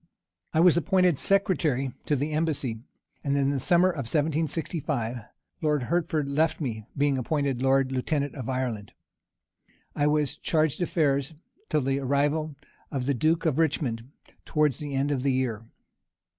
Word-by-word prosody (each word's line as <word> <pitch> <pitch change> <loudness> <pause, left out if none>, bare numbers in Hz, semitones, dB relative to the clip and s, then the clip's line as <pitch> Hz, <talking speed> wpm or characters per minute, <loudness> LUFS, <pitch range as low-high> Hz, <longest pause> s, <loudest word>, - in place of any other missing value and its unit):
I 160 - +3
was 175 -2 +6
appointed 180 -3 +3
secretary 165 - +1 0.2
to 150 - +2
the 145 +3 -2
embassy; 150 -7 -1 0.4
and, 140 -1 +1
in 140 0 +1
summer, 175 +7 +4
1765, 150 -4 -1 0.4
Lord 150 -4 +1
Hertford 160 0 0
left 155 +3 +1
me, 110 -7 -4
being 140 -1 +2
appointed 140 -1 -1
lord 135 0 +3
lieutenant 140 +2 -1
of 130 -3 -6
Ireland. 125 -6 -3 1.0
I 145 - +2
was 150 -2 0
chargé 155 -3 +1
d'affaires 150 -5 0 0.3
till 150 - +2
the 135 +1 0
arrival 145 +3 0 0.3
of 135 -3 -3
the 140 - +1
duke 160 +7 +1
of 155 -2 +1
Richmond, 130 -7 0 0.3
towards 150 -5 +1
the 145 -2 -4
end 140 +2 +1
of 135 -3 0
the 135 0 +1
year. 115 -4 -2
145 Hz, 145 wpm, -27 LUFS, 130-155 Hz, 1.0 s, was